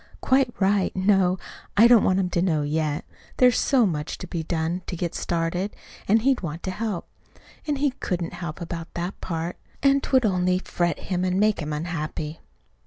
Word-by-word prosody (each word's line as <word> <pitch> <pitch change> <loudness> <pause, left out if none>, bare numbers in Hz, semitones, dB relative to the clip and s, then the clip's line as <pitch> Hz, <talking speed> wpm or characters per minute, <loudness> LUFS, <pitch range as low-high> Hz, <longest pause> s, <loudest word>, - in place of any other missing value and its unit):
"Quite 260 -1 +3
right. 195 0 +2
No, 190 -1 +3 0.4
I 225 +3 +8
don't 235 -3 +6
want 185 0 +3
him 180 -2 0
to 170 - +1
know 160 -5 +1
yet. 150 0 -1 0.3
There's 250 -2 +5
so 255 -4 +4
much 155 -5 -2
to - - -7
be 170 -1 -3
done 165 +2 -2
to - - -3
get 170 0 -3
started, 175 +4 -2 0.3
and 220 +2 +4
he'd 270 -1 +3
want 165 -1 -5
to 185 - -2
help. 210 -2 -3 0.6
And 295 -2 0
he 285 0 +2
couldn't 180 -9 -3
help 170 -2 -6
about 165 -1 -6
that 175 +3 -4
part; 170 0 -3 0.3
and't 275 0 +3
would 260 -3 +5
only 180 -2 +2
fret 175 -3 -1
him 180 -1 -2
and 185 +1 +1
make 210 0 +3
him 155 -2 -3
unhappy." 155 0 -4
180 Hz, 185 wpm, -25 LUFS, 165-210 Hz, 0.6 s, I